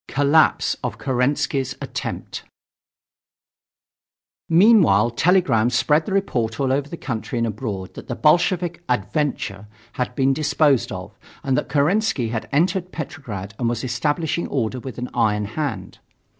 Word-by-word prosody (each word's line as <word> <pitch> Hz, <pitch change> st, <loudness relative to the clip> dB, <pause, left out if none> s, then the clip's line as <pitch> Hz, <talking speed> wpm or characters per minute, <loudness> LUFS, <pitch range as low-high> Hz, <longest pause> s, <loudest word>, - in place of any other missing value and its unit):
COLLAPSE 145 Hz, +3 st, +3 dB
OF -, -, -3 dB
KERENSKY'S 135 Hz, 0 st, 0 dB
ATTEMPT 130 Hz, -3 st, -5 dB, 2.1 s
Meanwhile 165 Hz, -, +5 dB
telegrams 125 Hz, -, +2 dB
spread 150 Hz, +5 st, +2 dB
the -, -, -3 dB
report 120 Hz, -, -1 dB
all 135 Hz, -1 st, +1 dB
over 140 Hz, +1 st, -1 dB
the 170 Hz, -, -6 dB
country 120 Hz, -3 st, -4 dB
and 115 Hz, -, +1 dB
abroad 105 Hz, -4 st, -5 dB
that -, -, -10 dB
the 120 Hz, -, -3 dB
Bolshevik 175 Hz, +3 st, +2 dB
"adventure" 105 Hz, -3 st, -2 dB, 0.2 s
had 125 Hz, 0 st, -3 dB
been 135 Hz, 0 st, +2 dB
disposed 140 Hz, -4 st, +2 dB
of 90 Hz, -1 st, -8 dB, 0.2 s
and 135 Hz, -1 st, +1 dB
that -, -, -1 dB
Kerensky 150 Hz, -, +1 dB
had 110 Hz, -1 st, -4 dB
entered 180 Hz, +4 st, +1 dB
Petrograd 105 Hz, -, -6 dB
and 120 Hz, -2 st, +1 dB
was 120 Hz, -1 st, -3 dB
establishing 150 Hz, +6 st, -1 dB
order 130 Hz, -2 st, -2 dB
with 130 Hz, 0 st, -8 dB
an 125 Hz, 0 st, -4 dB
iron 105 Hz, -1 st, +1 dB
hand. 145 Hz, +7 st, -4 dB
135 Hz, 135 wpm, -22 LUFS, 115-155 Hz, 2.1 s, Meanwhile